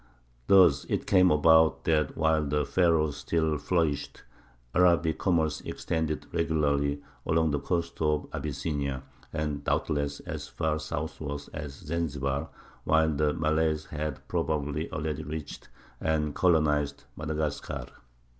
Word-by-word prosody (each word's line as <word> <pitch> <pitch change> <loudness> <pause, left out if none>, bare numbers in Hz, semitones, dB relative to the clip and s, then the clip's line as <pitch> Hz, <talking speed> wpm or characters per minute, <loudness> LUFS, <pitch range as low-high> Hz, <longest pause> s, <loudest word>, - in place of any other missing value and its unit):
Thus 90 -8 +6
it - - -2
came 90 -1 +5
about 80 +1 +5
that 75 -3 +1
while 80 -1 +2
the 75 0 0
Pharaohs 80 -3 +2
still 80 -3 0
flourished, 75 -3 -1 0.5
Arabic 85 -2 +3
commerce 80 -5 +1
extended 80 -2 -2
regularly 70 -3 +1 0.2
along 80 -1 +2
the 70 - 0
coast 85 +2 -2
of 75 -1 +1
Abyssinia, 70 -2 -3 0.3
and 75 -2 -3
doubtless 70 -1 -1
as - - -6
far 80 -1 -1
southward 75 -1 -4
as 75 -2 -5
Zanzibar, 70 -3 -2 0.3
while 80 0 +3
the 75 +1 +2
Malays 80 0 +1
had 75 -2 -5
probably 75 0 -1
already 75 0 -3
reached 75 0 -7 0.3
and 75 -2 0
colonized 75 -6 +2
Madagascar. 75 -1 -3
75 Hz, 115 wpm, -28 LUFS, 75-80 Hz, 0.5 s, Thus